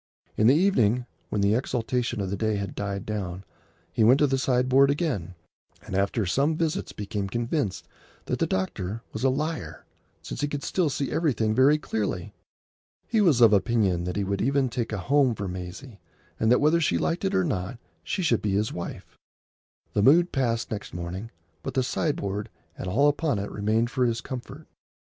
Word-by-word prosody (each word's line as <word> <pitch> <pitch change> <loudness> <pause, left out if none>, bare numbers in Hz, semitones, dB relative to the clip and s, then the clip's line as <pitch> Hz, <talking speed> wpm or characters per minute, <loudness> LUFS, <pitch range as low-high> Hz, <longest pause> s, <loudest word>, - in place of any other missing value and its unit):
In 110 - +3
the 130 - +6
evening, 125 - +3 0.2
when 105 - -1
the 100 +1 +3
exaltation 120 -1 -1
of 95 -1 -3
the - - 0
day 110 +1 0
had 100 -1 -3
died 100 -1 -4
down, 95 -3 -4 0.5
he 110 - +2
went 120 +5 +6
to 145 - +4
the 135 -1 +1
sideboard 130 +2 +3
again, 140 - -1 0.5
and - - -9
after 100 +3 +1
some 140 - +1
visits 160 -2 -1
became 100 -1 -4
convinced 120 - -2 0.4
that - - -2
the - - +2
eye - - -8
doctor 95 +3 -2
was 110 - -4
a 135 - +5
liar, 155 +5 -3 0.4
since - - -6
he 145 - +1
could 145 -1 -4
still 180 -5 +1
see 140 -1 -2
everything 115 -10 +1
very 135 +6 +5
clearly. 105 - -3 0.7
He 225 -2 +2
was 155 - +4
of 115 -2 +7
opinion 95 -4 +2
that 90 - -3
he 100 - 0
would 100 0 -1
even 135 0 +1
make 120 -2 -2
a 105 - -2
home 130 +4 +2
for 100 -1 -4
Maisie, 90 +6 -7 0.4
and 110 - +2
that 125 - +5
whether 155 +3 +4
she 150 - +2
liked 170 +3 -1
it 195 0 0
or 190 - +3
not 110 - -2 0.3
she 190 - -2
should 120 -9 +2
be 105 -2 -1
his 105 +2 0
wife. 85 - -7 0.8
The 105 - +2
mood 170 - +5
passed 115 -3 -1
next 105 -4 -5
morning, 90 +6 -5 0.3
but - - -5
the 130 - +2
sideboard 105 - -2 0.3
and - - -6
all 130 +11 +3
upon 145 -3 +1
it 100 +1 -4
remained 110 +3 0
for 130 -2 +1
his 115 -1 -1
comfort. 125 -2 -7
115 Hz, 195 wpm, -26 LUFS, 100-140 Hz, 0.8 s, of